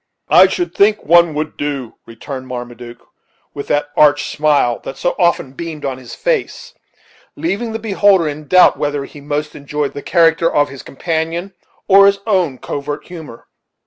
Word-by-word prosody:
"I - - +8
should 355 -1 -3
think 210 +1 +2
one 170 -1 +4
would 155 0 -4
do," 140 -5 -4
returned 130 +3 -8
Marmaduke, 120 -1 -9 0.5
with 140 - -7
that 145 0 0
arch 145 -1 +3
smile 145 -6 +2
that 135 - -8
so 175 - -1
often 170 -7 +1
beamed 155 +1 -7
on 130 -1 -3
his 125 - -10
face; - - -2 0.6
leaving 235 -7 -3
the 220 - -3
beholder 200 -5 +2
in 150 0 -6
doubt 185 +3 +5
whether 145 -1 -2
he 145 - -13
most 150 +1 -3
enjoyed 145 0 -4
the 145 - -7
character 165 0 +2
of 145 0 +2
his 135 -1 -10
companion 165 +5 -3 0.3
or 195 0 +7
his 200 0 +3
own 180 - 0
covert 145 +2 -5
humor. 160 -9 -10
150 Hz, 165 wpm, -16 LUFS, 140-180 Hz, 0.6 s, I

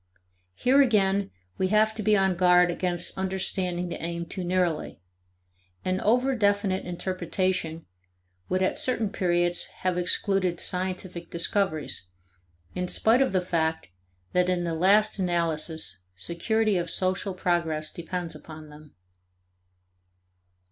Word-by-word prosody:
Here 265 - +4
again 200 -5 +2 0.3
we 185 - +2
have 215 +2 +3
to 220 - -5
be 210 0 +3
on 190 -1 +2
guard 180 0 +5
against 175 -1 -2
understanding 185 -2 -2
the - - -6
aim 170 0 -3
too 185 +2 -5
narrowly. 175 - -1 0.9
An 185 0 0
over 250 +5 +3
definite 200 -3 +1
interpretation 180 -2 -2 0.6
would 185 +1 +1
at 185 - +1
certain 230 -5 0
periods 175 -1 +1 0.2
have 180 -1 0
excluded 180 0 +1
scientific 180 -2 -3
discoveries, 170 - -1 0.7
in 180 0 -2
spite 225 +7 +3
of 270 - +2
the 185 -1 +1
fact 160 - -1 0.4
that 180 0 +3
in 180 -1 0
the 170 -1 -2
last 205 +6 +3
analysis 160 - -1
security 205 - 0
of 175 -1 -2
social 185 +1 -1
progress 165 -4 0
depends 170 0 -5
upon 155 0 -11
them. 150 0 -15
180 Hz, 125 wpm, -26 LUFS, 170-195 Hz, 0.9 s, guard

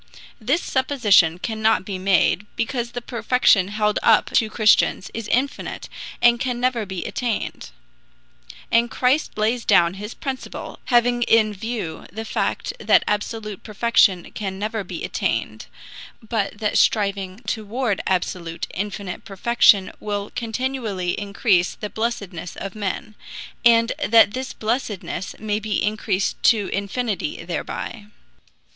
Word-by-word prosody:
This 265 +9 0
supposition 215 - +3
cannot 220 0 0
be 190 -2 -4
made, 195 +1 +2
because 235 0 -2
the 245 -1 -5
perfection 230 -5 +3
held 210 0 0
up 225 - +4
to 220 - +2
Christians 215 -3 +3
is 225 -2 -5
infinite 265 +5 -2 0.3
and 240 0 +6
can 250 -1 -2
never 245 -4 0
be 190 -2 -5
attained; 240 -4 -3 1.0
and 235 +1 +3
Christ 255 +5 +1
lays 225 +3 +1
down 170 0 +4
his 210 +3 -7
principle, 265 -2 -6
having 240 0 +3
in 220 -2 +4
view 205 -6 -5
the 220 +4 -6
fact - - -2
that - - +4
absolute 210 -1 -3
perfection 215 -4 +2
can 190 -2 -5
never 215 +1 -3
be 175 -2 -7
attained, - - -2 0.6
but 210 -3 -1
that 210 0 +1
striving 200 -1 +1
toward 220 0 -2
absolute, 175 -2 -2
infinite 200 -1 -5
perfection 200 -1 +3
will 205 -1 -4
continually 225 -6 -2
increase 200 -2 +1
the 210 - -6
blessedness 200 -7 -4
of 195 -2 -6
men, 210 0 -4 0.5
and 230 -1 +5
that 225 -1 +6
this 260 +3 -4
blessedness 215 -5 -3
may 210 0 -2
be 215 -2 -1
increased 205 -2 -1
to 215 -5 +3
infinity 220 - -3
thereby. 210 -3 -5
215 Hz, 125 wpm, -22 LUFS, 195-235 Hz, 1.0 s, and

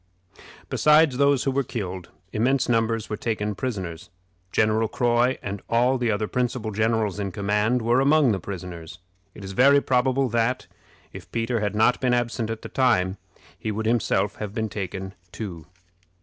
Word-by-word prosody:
Besides 150 -3 +4
those 140 -1 +3
who 135 - +1
were 140 +1 +1
killed, 95 -8 -5 0.2
immense 130 +5 +1
numbers 115 -2 +1
were 105 - -3
taken 105 -2 -2
prisoners. 95 -8 -5 0.4
General 110 +1 +2
Croy, 120 +3 +1
and 100 0 -5
all 125 +3 +2
the 120 -2 0
other 105 0 0
principal 125 -2 -2
generals 110 -1 0
in 100 -2 -2
command, 105 +4 0
were 120 +3 +3
among 140 -1 +4
the 100 - -1
prisoners. 85 -3 -8 0.4
It 105 - -10
is 95 - -6
very 140 +7 +5
probable 130 0 +1
that, 115 +2 0 0.5
if - - -11
Peter 115 +1 -1
had 105 -1 -2
not 110 +3 +3
been 125 -1 +2
absent 120 -2 -1
at 115 -1 -5
the - - -7
time, 105 -8 +2 0.4
he 110 - -4
would 110 +1 -3
himself 105 -3 +1
have 105 -1 -6
been 110 -1 -1
taken 95 -1 -5 0.2
too. 90 -7 -7
110 Hz, 165 wpm, -24 LUFS, 100-125 Hz, 0.5 s, very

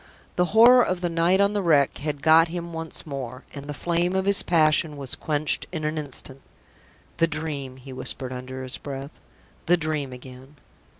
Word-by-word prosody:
The 180 - +2
horror 235 +6 +7
of 185 -5 -1
the 175 - 0
night 170 +3 +2
on 200 +1 +3
the 205 - 0
Wreck 150 -6 +2
had 145 -1 -4
got 160 +1 +6
him 170 0 -6
once 160 -1 -6
more, 130 -3 -6
and 140 -1 -8
the 145 - -4
flame 175 +4 0
of 190 0 0
his 200 0 +5
passion 155 -2 +2
was 135 -3 -4
quenched 150 -1 0
in 160 -3 -4
an 155 +1 -1
instant. 135 -2 -7 0.8
"The 165 - +3
Dream!" 150 -5 -5
he 130 +1 -11
whispered, 130 0 -3
under 130 +1 -7
his 130 - -6
breath. 140 0 -8 0.5
"The 175 +1 +5
Dream 155 -4 -2
again!" 130 +2 -12
155 Hz, 185 wpm, -24 LUFS, 135-170 Hz, 0.8 s, horror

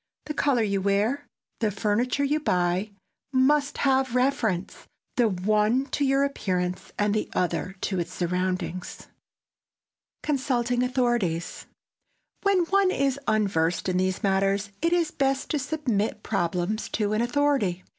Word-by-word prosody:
The 300 - -4
color 275 -6 +2
you 200 -2 0
wear, 210 +9 0 0.3
the 220 - +1
furniture 215 +7 0
you 295 +2 +1
buy 180 - 0 0.4
must 285 +2 +2
have 265 -2 +2
reference, 250 -8 0 0.3
the 240 -3 +3
one 210 +7 +2
to 290 - 0
your 275 0 +3
appearance, 185 -9 -2
the 210 +1 0
other 185 +1 -1
to 190 -3 -1
its 170 - -3
surroundings. 180 0 -2
[Sidenote: - - -11 1.1
CONSULTING 250 -4 0
AUTHORITIES] 240 -10 -1 0.7
When 390 -3 +3
one 390 +2 +3
is 275 -5 0
unversed 190 -7 +1
in 180 -1 +1
these 185 0 0
matters 195 +1 +1
it 335 +1 +2
is 345 -2 +2
best 270 -1 0
to 300 - +1
submit 260 -7 -1
problems 180 +2 -1
to 210 -1 0
an 215 - +1
authority. 240 -8 +1
220 Hz, 135 wpm, -26 LUFS, 190-275 Hz, 1.1 s, the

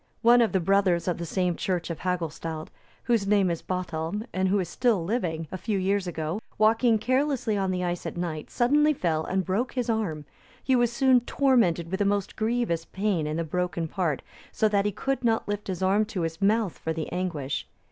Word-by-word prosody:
One 240 +1 +7
of 230 - +2
the 190 - +2
brothers 185 -1 +2
of 175 - -1
the 170 - -4
same 180 +1 0
church 180 -1 -2
of 165 - -5
Hagulstald, 165 -3 -3 0.3
whose 230 -5 +1
name 200 -3 +3
is 170 - -3
Bothelm, 180 +2 -3
and 185 +1 +1
who 195 +2 +2
is 180 - -1
still 215 0 +1
living, 165 -7 -2
a 185 - -5
few 210 +1 -1
years 195 0 0
ago, 165 +4 -3 0.2
walking 225 +2 +4
carelessly 255 -1 0
on 195 -1 0
the 180 -1 -1
ice 175 0 -2
at - - -6
night, 165 -3 -4
suddenly 295 +5 +3
fell 160 -7 0
and 190 +1 -1
broke 215 +7 -1
his 245 -2 0
arm; 170 -10 -2 0.4
he 260 - +3
was 240 -1 +3
soon 255 +1 +4
tormented 235 - +2
with 190 +2 -1
a - - +3
most 200 -1 0
grievous 220 -7 0
pain 190 -6 -1
in 155 +1 -2
the 165 - 0
broken 175 0 -2
part, 160 -4 -1 0.3
so 220 - +2
that 205 -1 +1
he 205 - +1
could 270 +7 -2
not 225 -1 +1
lift 205 0 -3
his 190 -1 -3
arm 195 +3 +3
to 205 -4 -4
his 165 +3 -3
mouth 210 -1 +1
for 160 - -2
the 160 -1 -4
anguish. 170 -7 -3
190 Hz, 210 wpm, -26 LUFS, 170-225 Hz, 0.4 s, One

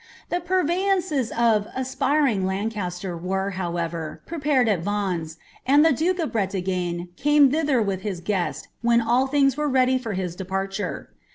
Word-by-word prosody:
Tbi 350 - 0
__ 370 -1 +2
veyances 355 - 0
of 225 -3 +2
>* - - -18
aspiring 260 -3 +1
Lancaster" 190 -2 -3
were, 190 +3 -2
however, 170 -3 -3
prepared 290 -6 +1
U 205 -4 +3
Vtf 175 -4 -2 0.3
and 285 +4 +5
the 325 - +5
duke 350 +7 0
of 330 -4 -2
Bretagne 180 -4 -2
came 295 -1 +4
thither 290 -6 +2
with 195 -2 -2
his 195 -4 -4
guest, 175 -6 -2
when 235 0 +4
all 240 +3 +2
ihi 275 -1 +3
were 300 0 -1
ready 255 -1 +3
for 230 -4 -4
his 185 -2 -3
departure. 195 +2 -4
215 Hz, 160 wpm, -24 LUFS, 185-275 Hz, 0.3 s, and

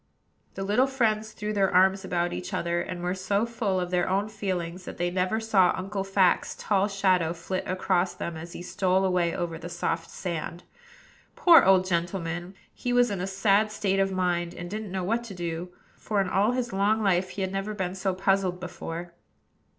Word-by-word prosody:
The 195 - -3
little 215 +7 +3
friends 220 -5 0
threw 210 0 -4
their 195 -2 +2
arms 190 +1 +4
about 175 -2 -1
each 90 0 -4
other, 170 0 0
and 175 0 -5
were 180 +1 0
so 200 +3 0
full 225 -5 -1
of 180 0 -3
their 180 0 +1
own 200 +3 0
feelings 185 -4 -4
that - - -8
they 175 0 0
never 185 +4 0
saw 210 -5 +3
Uncle 195 +1 -3
Fact's 195 -2 +2
tall 200 -1 +1
shadow 185 -5 +2
flit 175 +2 -4
across 185 -1 0
them, 170 - -4
as 170 +2 -8
he - - -7
stole 185 +1 +1
away 180 -2 +1
over 170 -3 -3
the 170 +1 -7
soft 165 -1 -2
sand. 170 -1 -5 0.7
Poor 340 -2 +8
old 190 -1 +5
gentleman! 175 0 -2 0.2
he 245 - -3
was 245 -2 +4
in 195 -3 -2
a 185 - -2
sad 200 +2 +2
state 195 -2 0
of 195 0 +2
mind, 175 -2 -1
and 175 0 -7
didn't 215 -2 -5
know 190 -1 -2
what 230 +6 0
to 200 -4 -8
do; 170 0 -4 0.3
for 210 -2 -1
in 195 - +1
all 205 +5 +2
his 245 -3 -2
long 210 +3 +2
life 185 -2 +2
he 195 - -4
had 190 - -2
never 195 +2 -3
been 185 -2 -2
so 190 0 -1
puzzled 190 -1 +1
before. 175 -1 -6
190 Hz, 200 wpm, -27 LUFS, 175-200 Hz, 0.7 s, Poor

